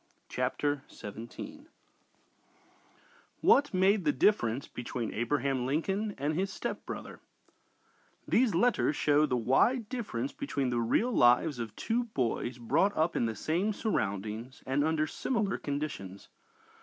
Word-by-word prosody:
CHAPTER 145 -1 -1
XVII 120 - -9 1.7
WHAT 285 +1 +5
MADE 190 +1 +3
THE 150 - +3
DIFFERENCE 130 - +2
BETWEEN 120 -2 -4
ABRAHAM 130 +2 0
LINCOLN 195 +9 -1
AND 145 +3 -1
HIS 190 +4 -1
STEPBROTHER - - -6 1.1
These 235 -6 +3
letters 190 -6 +2
show 150 +2 +3
the 125 - 0
wide 210 - +2
difference 255 +3 -3
between 145 - -2
the 120 -1 +1
real 210 - +1
lives 125 - +4
of 110 -2 -5
two 235 +2 -1
boys 125 - -2
brought 155 - +1
up 160 +2 +1
in 115 - +1
the 110 - -3
same 175 - 0
surroundings, 110 - -3
and 135 +2 +1
under 155 0 +1
similar 215 +3 -1
conditions. 140 -10 -5
150 Hz, 125 wpm, -30 LUFS, 120-205 Hz, 1.7 s, WHAT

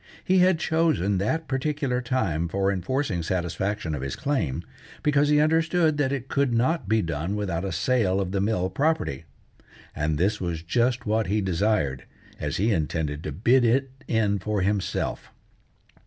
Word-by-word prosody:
He 185 0 +3
had 180 -1 +4
chosen 155 - +1
that 160 +11 -1
particular 135 -2 -1
time 95 - -1
for 95 +3 0
enforcing 100 - -1
satisfaction 90 +1 -2
of 70 - -3
his 70 -1 -3
claim, 85 - -1 0.4
because 145 0 +3
he 150 0 +4
understood 160 0 +2
that 140 -2 +1
it 135 -2 -3
could 140 -2 +1
not 125 - +1
be 110 0 +3
done 85 +4 -2
without 95 -5 -2
a 95 - -3
sale 110 -7 +1
of 95 -2 -2
the 100 -1 0
mill 95 -3 0
property; 140 - 0 0.7
and 75 +1 0
this 100 +6 +1
was 85 -3 -3
just 120 +7 0
what 110 +1 +1
he 105 +3 +1
desired, 90 -8 0 0.3
as - - -2
he 110 +5 +2
intended 75 -3 -1
to 75 - -4
bid 120 - +3
it 130 +3 +2 0.2
in 105 -3 +1
for 105 +1 -1
himself. 100 0 -2
105 Hz, 165 wpm, -25 LUFS, 90-135 Hz, 0.7 s, had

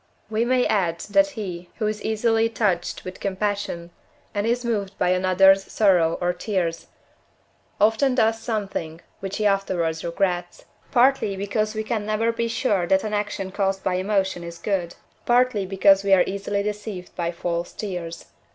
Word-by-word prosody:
We 220 +2 +1
may 250 0 +2
add, 170 -5 0
that 295 +6 +5
he, 180 -4 -5
who 220 - -2
is 210 0 -2
easily 225 +1 +2
touched 195 -6 -1
with 185 0 -7
compassion, 195 -3 -2 0.4
and 205 +1 -1
is 240 +1 0
moved 200 -4 -2
by - - +1
another's 185 +1 +4
sorrow 180 -6 +3
or 180 0 0
tears, 175 -3 -2 0.9
often 225 +5 +3
does 225 -2 +2
something 195 -8 -4 0.2
which 195 0 -4
he 210 - -1
afterwards 180 -5 0
regrets; 175 0 -2 0.3
partly 250 -5 +3
because 215 +2 -1
we 220 - -2
can 215 -1 -2
never 215 +2 +1
be 230 0 -2
sure 210 -6 0
that 190 +1 +3
an 215 -1 -3
action 205 -2 -2
caused 195 -1 -1
by 185 - 0
emotion 190 -1 0
is 170 0 -8
good, 175 -1 -2 0.3
partly 240 -5 +3
because 195 0 +4
we 200 -1 +3
are 180 - +4
easily 200 +1 -2
deceived 210 -3 -5
by 170 -1 -1
false 170 0 -3
tears. 175 -5 -6
195 Hz, 160 wpm, -23 LUFS, 180-215 Hz, 0.9 s, that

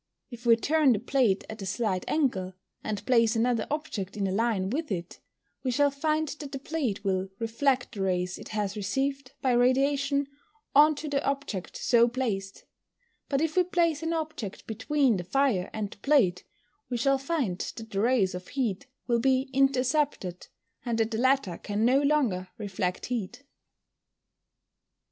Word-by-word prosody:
If 240 0 -8
we 230 - +8
turn 290 +2 +3
the 210 - -1
plate 240 -4 +1
at 220 -1 -8
a - - -4
slight 190 -2 -1
angle, 190 - 0 0.3
and 210 -2 -4
place 230 -3 +3
another 230 -1 +1
object 225 -11 -4
in 200 - 0
a 190 - 0
line 200 -2 0
with 305 0 -2
it, 170 -2 -4 0.4
we 260 - -2
shall 285 +3 +3
find 310 +2 0
that 290 -1 -7
the 275 - -4
plate 270 -8 -3
will 190 -1 0
reflect 245 +4 0
the 205 -4 -6
rays 180 -1 -1
it - - -10
has 210 -2 -2
received 270 +6 -2
by 260 - +3
radiation, 275 +3 +2 0.5
on 300 +2 +6
to 300 +2 -6
the 285 -1 0
object 275 -9 -3
so 235 -1 +4
placed; 220 -6 -3 0.6
but 275 0 +1
if 315 -1 0
we 365 - +5
place 335 -3 +1
an 325 0 -2
object 315 - -4
between 250 +1 +1
the 180 - -4
fire 205 -1 +1
and 210 -2 -4
the - - -12
plate, 200 -10 +2 0.4
we 245 - -1
shall 275 +3 +2
find 270 - -1 0.2
that 225 -1 -9
the 195 - -1
rays 220 -5 +2
of 180 0 -7
heat 255 -2 -2 0.2
will 235 -1 +2
be 265 +2 +1
intercepted, 265 - +1 0.4
and 235 -2 -1
that 225 0 +1
the 220 - -2
latter 260 -9 +2
can 210 +2 -1
no 260 +3 +4
longer 265 -11 +1
reflect 190 -4 -3
heat. 240 +1 -4
245 Hz, 170 wpm, -28 LUFS, 200-280 Hz, 0.6 s, we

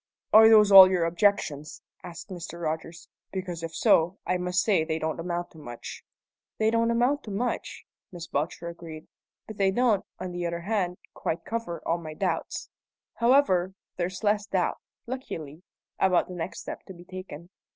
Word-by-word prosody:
"Are 220 +1 +9
those 210 -2 +6
all 190 -1 +11
your 180 -3 +1
objections?" 165 -4 0 0.2
asked 175 +3 -9
Mr. 170 -2 -7
Rogers. 165 +1 -4 0.2
"Because, 180 -3 -5
if 165 -1 -6
so, 180 -1 +3
I 180 - +1
must 180 +1 +1
say 195 -7 +2
they 160 0 -2
don't 160 0 -3
amount 175 0 -3
to 160 - -15
much." 120 -5 -9 0.5
"They 220 0 +2
don't 230 0 +2
amount 245 +5 +1
to - - -7
much," 225 +5 -3 0.3
Miss 175 -2 -7
Belcher 160 +3 -3
agreed, 165 -2 -9 0.4
"but 215 - -10
they 195 -1 +3
don't, 220 -1 +2 0.2
on 185 - -5
the 175 0 -4
other 170 0 -4
hand, 185 -2 -1 0.2
quite 165 +1 -3
cover 225 -7 -4
all 170 +1 +1
my 155 -2 -8
doubts. - - -3 0.5
However, 210 -8 +3 0.2
there's 180 +2 -3
less 205 0 +1
doubt, 190 -3 0 0.3
luckily, 165 - -7 0.4
about 185 -2 +3
the 185 - -8
next 175 0 -5
step - - -7
to 190 - -10
be 175 - -13
taken. 185 -2 -9
180 Hz, 170 wpm, -27 LUFS, 170-205 Hz, 0.5 s, all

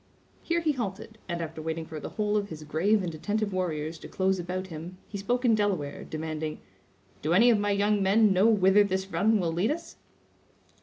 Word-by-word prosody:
Here 340 0 0
he 320 -2 +2
halted, 220 -3 -5
and 170 -1 -2
after 160 0 -6
waiting 160 +1 -3
for 155 -1 -7
the - - -6
whole 210 -1 -1
of 205 -1 0
his 155 -3 -8
grave 190 +7 +1
and 170 -2 -3
attentive 205 +5 -2
warriors 160 -3 -2
to - - -9
close 190 0 0
about 180 +2 -3
him, 170 +1 -8
he 200 - -6
spoke 245 +5 -1
in 235 - +5
Delaware, 195 -9 -1
demanding: 155 0 -4 0.6
"Do 155 +3 0
any 235 +7 +6
of 220 - +3
my 205 0 0
young 205 +1 +2
men 200 +2 +4
know 190 +4 +4
whither 205 -2 +5
this 190 -1 -1
run 220 +1 +3
will 170 -3 -1
lead 180 +7 +1
us?" 330 +2 -4
190 Hz, 205 wpm, -28 LUFS, 165-210 Hz, 0.6 s, any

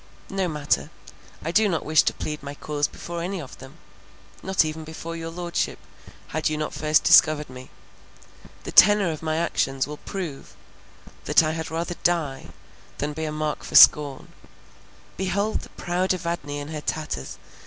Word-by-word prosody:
No 195 -1 0
matter: 150 -3 -1 0.6
I 165 - -1
do 210 +3 +3
not 165 -4 -2
wish 155 0 +5
to - - 0
plead 150 0 -5
my 140 0 -7
cause 145 0 -1
before 170 0 -7
any 185 +2 -3
of 140 -6 -10
them, 135 +5 -13 0.6
not 190 -3 +2
even 155 +1 -5
before 160 +1 -7
your 165 0 -5
Lordship, 170 0 -3 0.5
had 155 0 -1
you 155 - -2
not 155 0 -3
first 155 +1 +2
discovered 150 -3 +5
me. 130 0 -11 0.9
The - - -6
tenor 205 -4 +6
of 155 - -6
my 155 -1 -1
actions 135 -5 0
will 150 +1 -8
prove 175 -8 -7 0.7
that - - +5
I 155 - 0
had 160 0 -4
rather 170 +2 -3
die, 160 -6 0 0.5
than 150 +1 -3
be 160 +1 -4
a 155 - -3
mark 155 0 -3
for - - -7
scorn—behold 185 +7 +2
the - - -12
proud 180 +2 -1
Evadne 170 -5 -4
in 145 +1 -6
her 155 -1 -5
tatters! 150 - -4
155 Hz, 165 wpm, -24 LUFS, 150-170 Hz, 0.9 s, tenor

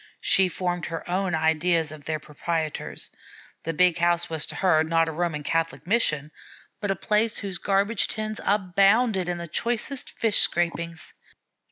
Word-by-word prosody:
She 190 -1 +4
formed 175 -1 -2
her 165 -1 -6
own 180 -1 0
ideas 160 0 +1
of 155 -2 -11
their 155 0 -1
proprietors. 155 +1 -4 0.5
The 165 - -1
big 180 0 +3
house 175 0 +1
was 160 -2 0
to - - -6
her, 165 -5 +3
not 165 0 +2
a - - -2
Roman 160 -2 -2
Catholic 165 +2 -1
mission, 155 -8 +1 0.5
but 205 - -3
a 195 - +1
place 215 +4 0
whose 195 -4 -4
garbage 200 +4 +1
tins 215 0 -4
abounded 195 +1 +2
in 170 -1 -4
choicest 240 - -2
fish 225 -2 +3
scrapings. 170 -1 +1
175 Hz, 155 wpm, -25 LUFS, 160-195 Hz, 0.5 s, She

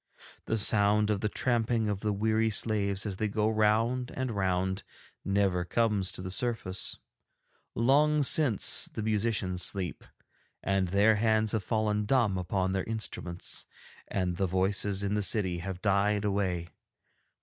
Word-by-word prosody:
The 115 - -1
sound 105 0 +4
of 100 -2 -1
the 105 - 0
tramping 115 -1 0
of 105 -2 -2
the 105 +1 -1
weary 110 +2 +1
slaves 100 -2 0
as 100 -3 -3
they 110 - 0
go 105 +1 0
round 110 +3 +1
and 130 -2 -2
round 95 -1 -1 0.4
never 95 -2 +1
comes 105 -1 0
to 90 - -7
the 95 - -5
surface. 105 -3 -3 0.8
Long 145 +5 +3
since 135 -6 +3
the 110 - -5
musicians 105 -4 -1
sleep, 90 -5 -3 0.6
and 95 -1 +1
their 100 +4 +3
hands 110 0 +2
have 110 -3 -1
fallen 105 0 0
dumb 110 -4 +2
upon 95 +1 -1
their 95 -1 -1
instruments, 100 -5 -4 0.4
and 90 -3 -2
the 95 - +1
voices 95 +2 0
in 100 0 -1
the 105 - +1
city 95 -4 +1
have 95 +2 -6
died 105 +1 +2
away. 95 -4 -1
105 Hz, 150 wpm, -29 LUFS, 95-110 Hz, 0.8 s, sound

